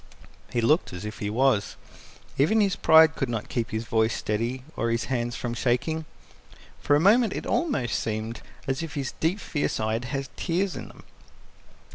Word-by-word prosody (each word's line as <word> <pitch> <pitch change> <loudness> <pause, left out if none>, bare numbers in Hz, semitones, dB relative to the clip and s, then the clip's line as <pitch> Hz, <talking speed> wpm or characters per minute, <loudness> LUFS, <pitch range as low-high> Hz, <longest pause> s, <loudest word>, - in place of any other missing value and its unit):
He 120 - 0
looked 150 - +2
as 90 +3 -6
if 105 - -6
he 105 - -2
was. 120 -2 +2 0.6
Even 165 +11 +3
his 200 -2 +2
pride 160 -3 +6
could 135 - -2
not 115 -3 -3
keep 115 -2 -2
his 110 +1 -3
voice 110 0 +1
steady 115 +4 -2
or 115 - -1
his 115 0 0
hands 120 -1 -1
from 120 0 -3
shaking. 140 +7 0 0.7
For 145 - +3
a - - +4
moment 210 +4 +4
it - - -5
almost 145 - 0
seemed 110 +1 -3 0.2
as 135 +3 -1
if 160 -2 -6
his 140 -3 -2
deep, 170 +6 +1
fierce 150 -7 -2
eyes 110 +2 -1
had 135 +1 -3
tears 180 +2 -1
in - - -6
them. - - -15
130 Hz, 180 wpm, -26 LUFS, 115-160 Hz, 0.7 s, pride